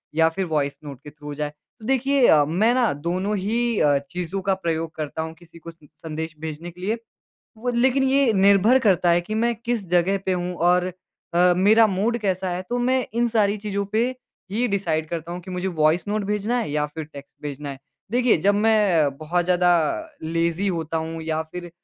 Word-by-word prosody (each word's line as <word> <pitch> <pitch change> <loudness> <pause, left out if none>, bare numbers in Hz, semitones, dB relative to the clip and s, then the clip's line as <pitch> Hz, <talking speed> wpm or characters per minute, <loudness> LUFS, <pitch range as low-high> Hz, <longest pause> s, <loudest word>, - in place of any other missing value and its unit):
या 160 0 +5
फ़िर 190 +3 -3
voice 145 -3 -1
note 140 -3 -8
के 150 - -9
थ्रू 150 0 -14
हो 145 - -4
जाए। 150 0 -2 0.3
तो 215 - -11
देखिए 270 0 +3
अ, 150 -2 +6
मैं 205 +10 +2
ना 250 -3 +2
दोनों 180 +8 -2
ही 230 +3 0
अ, 145 -2 +4
चीज़ों 180 +2 -4
का - - +5
प्रयोग 165 0 -1
करता 155 +1 -4
हूँ 160 0 -5
किसी 170 0 -17
को 170 +1 -9
स - - -25 0.3
संदेश 160 0 -5
भेजने 160 +2 -6
के 180 +2 -15
लिए। 215 +5 -1 0.6
वो 245 +2 -2
लेकिन 265 +1 +3
ये 270 -3 +3
निर्भर 200 +5 +5
करता 185 -7 +3
है 170 +1 +4
कि 215 +5 -6
मैं 235 +2 +1
किस 235 -4 -1
जगह 180 +3 +2
पे 190 - +2
हूँ 180 0 -2
और 180 0 +3 0.5
अ, 180 +1 +5
मेरा 220 +4 +5
मूड 215 +5 0
कैसा 190 -3 -1
है 180 +1 -3
तो 245 - -1
मैं 260 -1 +2
इन 240 +1 +2
सारी 215 -2 +2
चीज़ों 200 -1 -1
पे 230 +3 +2 0.4
ही 240 +3 +1
डिसाइड 160 -5 -1
करता 170 0 -5
हूँ 180 - -5
कि 185 +1 -10
मुझे 180 +1 -2
वॉइस 155 +3 +3
नोट 210 0 0
भेजना 210 +4 -1
है 225 - -2
या 150 0 0
फ़िर 155 +1 -7
टेक्स्ट 140 -2 -13
भेजना 145 -1 -5
है। 135 - -8 0.3
देखिए 245 -3 +3
जब 200 0 +4
मैं 200 -10 +3
बहुत 170 +3 -1
ज़्यादा 180 0 +3 0.5
लेज़ी 165 +4 0
होता 160 0 -3
हूँ 165 0 -6
या 160 0 -1
फ़िर 175 +2 -9
180 Hz, 210 wpm, -23 LUFS, 160-215 Hz, 0.6 s, अ